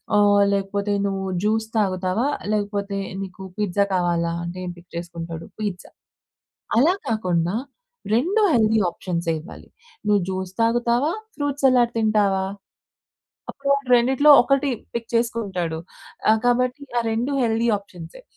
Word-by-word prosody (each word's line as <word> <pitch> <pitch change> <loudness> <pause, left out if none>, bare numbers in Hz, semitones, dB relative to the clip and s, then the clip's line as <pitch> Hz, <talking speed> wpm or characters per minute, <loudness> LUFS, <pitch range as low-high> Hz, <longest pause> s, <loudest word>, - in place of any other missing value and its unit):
ఆహ్, 205 -1 +5
లేకపోతే 200 +1 -1
నువ్వు 195 -1 -2 0.2
జ్యూస్ 220 +1 +1
తాగుతావా? 190 +1 0 0.3
లేకపోతే, 200 -1 -2 0.2
నీకు 190 0 -8
పిజ్జా 205 -1 +1
కావాలా? 170 -2 +1
అంటే, 170 +1 -6
ఏం 180 - -4
పిక్ 175 0 -17
చేసుకుంటాడు? 170 -1 -6
పీజ్జా. 200 -4 -4 0.9
అలా 305 +9 +5
కాకుండా 180 -5 0 0.6
రెండూ 350 - +2
హెల్తీ 220 -2 +3
ఆప్షన్సే 170 -1 -3
ఇవ్వాలి. 165 +7 -12 0.4
నువ్వు 210 -1 +3
జ్యూస్ 190 -1 -3
తాగుతావా? 240 +5 +2 0.2
ఫ్రూట్ 285 -2 -2
సలాడ్ 250 -3 +4
తింటావా? 205 -3 +2 1.1
అప్పుడాడు 280 -1 -1
రెండిట్లో 265 +5 +4
1 275 +2 +1 0.3
పిక్ 235 -1 -4
చేసుకుంటాడు. 200 -8 -1 0.5
ఆహ్, 220 0 +3
కాబట్టి 250 +3 +1 0.2
ఆ - - +3
రెండూ 235 +5 -1
హెల్తీ 230 0 +1
ఆప్షన్సే. 180 - -12
210 Hz, 120 wpm, -23 LUFS, 185-235 Hz, 1.1 s, ఆహ్